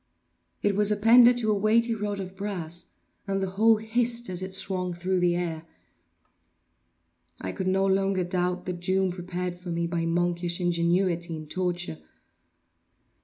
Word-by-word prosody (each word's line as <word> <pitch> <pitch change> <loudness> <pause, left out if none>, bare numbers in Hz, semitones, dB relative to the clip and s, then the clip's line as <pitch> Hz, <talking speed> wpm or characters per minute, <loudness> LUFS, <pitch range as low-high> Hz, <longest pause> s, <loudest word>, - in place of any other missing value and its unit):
It 205 -1 +2
was 210 +1 +3
appended 235 +4 +6
to 220 -3 +1
a - - +2
weighty 225 +3 +2
rod 205 -2 -3
of 190 0 -7
brass, 180 -4 -5 0.4
and 195 0 0
the 190 -1 -2
whole 220 +3 +4
hissed 235 0 0
as 180 0 -2
it 190 0 -5
swung 185 -2 -1
through 185 +2 -1
the 175 -1 +2
air. 165 -2 -3 1.7
I 95 - -4
could 190 - -4
no 190 +1 +2
longer 195 -1 +1
doubt 180 0 -1
the 180 - -2
doom 185 +2 0
prepared 180 0 -4
for 180 0 -9
me 170 0 -1
by 170 -1 -2
monkish 175 +1 0
ingenuity 175 0 +1
in 155 0 -7
torture. 175 - -3
185 Hz, 155 wpm, -26 LUFS, 175-200 Hz, 1.7 s, appended